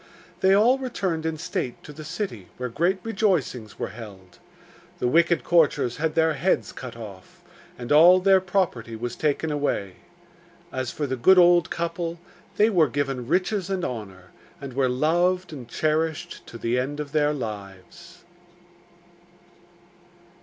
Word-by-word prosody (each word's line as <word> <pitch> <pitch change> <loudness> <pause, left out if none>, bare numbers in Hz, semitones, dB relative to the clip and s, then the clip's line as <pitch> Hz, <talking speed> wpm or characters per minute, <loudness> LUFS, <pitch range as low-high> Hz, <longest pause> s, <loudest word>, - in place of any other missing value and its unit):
They 190 +1 +4
all 240 +6 +4
returned 190 -11 -2
in 160 -1 -3
state 155 -7 -4
to 150 - -10
the 155 +2 -9
city, 155 - -5
where 125 0 -4
great 170 +11 +1
rejoicings 180 - -1
were - - -3
held. 95 -6 -12 0.6
The - - -1
wicked 170 +4 +3
courtiers 155 -8 +2
had 160 0 -1
their 160 -1 +3
heads 160 +6 0
cut 125 -3 -8
off, 100 -5 -11 0.3
and 120 +1 -7
all 170 +5 +8
their 190 0 +4
property 175 - -1
was 120 +2 -5
taken 155 +1 -1
away. 140 -10 -2 0.7
As 130 -1 -3
for 150 - -3
the 130 -1 -2
good 185 +10 +5
old 175 -2 +5
couple, 170 0 -3 0.4
they 215 +2 +4
were 165 -7 +3
given 135 -4 -2
riches 185 +4 0
and 190 -2 -1
honour, 95 - -7 0.3
and 140 -2 -8
were 130 0 +1
loved 175 +6 +1
and 130 -5 -8
cherished 155 +4 -2
to 115 - -9
the 115 +2 0
end 145 +4 -3
of 145 -2 -5
their 150 -1 +2
lives. 110 - -8
150 Hz, 150 wpm, -24 LUFS, 125-175 Hz, 0.7 s, all